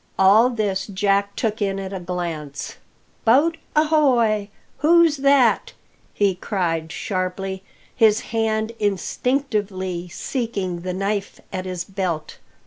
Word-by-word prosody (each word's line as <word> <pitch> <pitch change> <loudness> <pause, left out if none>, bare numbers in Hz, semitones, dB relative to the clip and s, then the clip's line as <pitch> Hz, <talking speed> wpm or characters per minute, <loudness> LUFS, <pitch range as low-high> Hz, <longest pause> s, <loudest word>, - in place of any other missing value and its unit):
All 205 +6 +6
this 205 -5 -1
Jack 200 0 +1
took 220 -2 -2
in 195 -1 0
at 195 0 -5
a 190 - -3
glance. 170 -5 -5 0.5
"Boat 290 +9 +4 0.2
ahoy! 255 -10 +3 0.3
Who's 330 0 +5
that?" 275 - +3 0.4
he 200 -2 +2
cried 170 -4 -2
sharply, 190 0 -3 0.3
his 220 -3 +4
hand 220 0 0
instinctively 205 -3 -1
seeking 195 -4 -3
the 180 +1 -4
knife 200 +1 -2
at 185 0 -3
his 180 -2 -3
belt. 180 -5 -4
200 Hz, 115 wpm, -22 LUFS, 185-230 Hz, 0.5 s, All